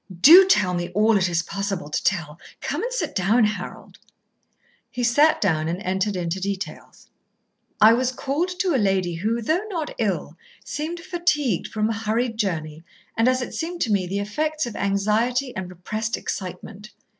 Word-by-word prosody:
Do 360 - +10
tell 200 - +3
me 175 0 -2
all 215 +2 +4
it 185 -2 +2
is 170 0 0
possible 195 -3 -4
to 150 - -3
tell. 170 -5 -1 0.2
Come - - -3
and 485 - -3
sit - - -2
down, 215 +6 +3
Harold." 210 -1 -4 0.9
He 245 - -4
sat 290 +7 +4
down 160 -6 +1
and 170 +2 -2
entered 190 +2 -1
into 175 0 -2
details. 195 -4 -6 0.7
"I 220 +1 +8
was 255 +2 +1
called 280 +7 -2
to 365 -3 +1
a 260 - +2
lady 190 -3 +1
who, 220 +7 -2
though 325 - +1
not 330 -6 -4
ill, 185 -7 -2 0.3
seemed 325 +3 -4
fatigued 305 - 0
from 215 0 -1
a 225 - -1
hurried 225 +1 -2
journey 155 -6 -2 0.3
and, 225 +2 +2
as 255 0 +2
it - - -7
seemed 340 +1 -4
to 225 - +1
me, 190 -3 +1
the 195 +3 -3
effects 305 +10 -2
of 240 - -7
anxiety 220 +6 0
and 185 -1 -5
repressed 215 +6 -4
excitement. 200 +2 -6
215 Hz, 175 wpm, -23 LUFS, 185-255 Hz, 0.9 s, Do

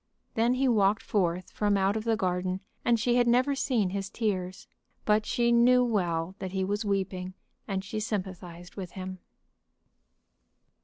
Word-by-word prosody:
Then 235 +3 +2
he 265 +1 +2
walked 210 -3 +3
forth 180 -3 -1
from 205 -1 +1
out 195 +1 +2
of 220 0 -3
the 225 -1 +2
garden, 185 0 -1 0.2
and 235 -1 +3
she 240 +2 +2
had 245 -1 +3
never 255 +4 +3
seen 240 -8 0
his 195 0 -3
tears. 185 -5 -3 0.4
But 215 0 +2
she 240 0 +2
knew 250 +1 +5
well 175 -6 0
that 190 -1 -5
he 190 -1 0
was 205 +3 -1
weeping, 190 -2 -2 0.3
and 195 -1 -2
she 215 +1 -4
sympathized 180 -4 -5
with 185 -4 -7
him. 185 -1 -6
200 Hz, 160 wpm, -28 LUFS, 185-230 Hz, 0.4 s, knew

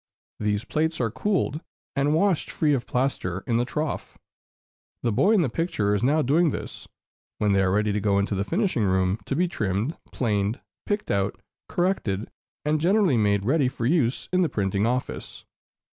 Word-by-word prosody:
These 105 +1 -1
plates 160 +3 -1
are 115 -3 0
cooled, 180 - -1 0.3
and 145 +2 +2
washed 185 -1 +2
free 150 -2 +1
of 130 -3 -1
plaster 110 -8 -1
in 115 - +1
the 120 - +1
trough, 150 +4 -4 0.9
the 120 - +1
boy 195 - +3
in 210 - +4
the 155 - +2
picture 115 - 0
is 105 - 0
now 150 +5 +3
doing 160 +6 +3
this, - - -6 0.5
when 105 -1 +1
they 100 0 +3
are 95 - +2
ready 105 +2 +1
to 105 - 0
go 100 -1 +2
into 100 +1 0
the 100 0 0
finishing 170 - 0
room, 95 +1 +1
to 135 - -1
be 180 +4 +2
trimmed, 110 - -1 0.2
planed, 105 -2 0 0.3
picked 205 +1 -1
out, 100 -1 0 0.3
corrected, 120 - -1 0.3
and 150 0 +1
generally 190 - +3
made 100 -3 +2
ready 135 +2 +3
for 120 -2 -3
use 135 -3 +1
in 185 - +4
the 170 - +2
printing 100 +1 0
office. 125 +1 -3
125 Hz, 180 wpm, -25 LUFS, 105-160 Hz, 0.9 s, in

